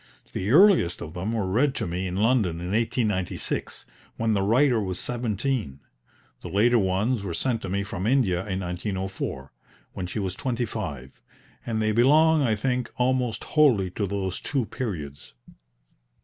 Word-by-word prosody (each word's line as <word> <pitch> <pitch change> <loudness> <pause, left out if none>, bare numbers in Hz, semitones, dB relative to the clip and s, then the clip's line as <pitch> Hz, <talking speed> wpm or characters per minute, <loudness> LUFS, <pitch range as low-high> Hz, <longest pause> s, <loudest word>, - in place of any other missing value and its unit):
The 95 - -2
earliest 170 - +5
of 80 - -8
them 95 +5 -3
were 110 -4 -1
read 130 +9 +1
to - - -2
me 90 +2 -3
in 90 - -4
London 105 -5 +2
in 90 +2 -5
1896, 110 -4 -1 0.3
when 115 -1 +1
the 100 - +1
writer 120 +3 +3
was 95 -2 -3
seventeen; 115 - -2 0.6
the - - -8
later 115 +4 +3
ones 100 +5 0
were 90 -4 -4
sent 120 +3 -1
to 95 - -5
me 100 +2 -1
from 100 -1 -4
India 115 -9 +2
in 95 -1 -2
1904, 95 - -4 0.4
when 90 - -4
she 90 - -6
was 95 -3 -2
twenty 125 +2 -2
five; 75 - -6 0.5
and 110 -2 -1
they 110 - +2
belong, 150 +7 +5
I 115 -5 +2
think, 125 +2 -1
almost 125 -2 0
wholly 120 - +3
to 100 +2 -2
those 95 -1 -3
two 135 -5 -1
periods. 75 - -6
105 Hz, 165 wpm, -25 LUFS, 95-125 Hz, 0.6 s, earliest